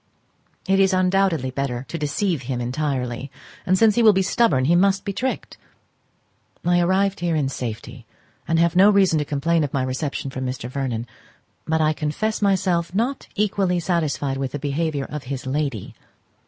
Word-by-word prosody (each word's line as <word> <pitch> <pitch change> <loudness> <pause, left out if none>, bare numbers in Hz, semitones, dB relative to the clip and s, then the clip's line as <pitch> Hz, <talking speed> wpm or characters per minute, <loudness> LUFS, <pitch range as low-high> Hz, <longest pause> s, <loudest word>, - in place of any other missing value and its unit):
It 195 0 +3
is 195 0 +4
undoubtedly 185 -7 +1
better 130 -1 -3
to 170 - -5
deceive 155 +2 -1
him 125 -2 -1
entirely, 130 0 -2 0.4
and 185 +1 +3
since 220 +1 +5
he 240 - +2
will 220 -2 +7
be 190 0 +2
stubborn 185 - +2
he 170 +5 +4
must 195 +2 +2
be 200 - -2
tricked. 260 +6 -4 1.1
I 175 0 +3
arrived 190 +3 +1
here 175 -2 0
in 145 -3 0
safety, 120 -1 -6 0.4
and 165 - +1
have 170 0 +2
no 195 +3 +7
reason 190 -6 +4
to 150 - -1
complain 155 +3 +1
of 145 - -3
my 135 - +1
reception 135 +1 -3
from 130 0 -5
Mr. 125 -1 -4
Vernon; 125 -3 -3 0.6
but 160 0 +1
I 155 0 +3
confess 155 +10 -2
myself 185 -3 +1
not 245 +6 -1
equally 195 -3 +1
satisfied 155 -5 -1
with 135 -1 -3
the - - -2
behaviour 145 0 -2
of 150 -1 -7
his 135 0 -5
lady. 135 -5 -3
155 Hz, 175 wpm, -22 LUFS, 135-190 Hz, 1.1 s, will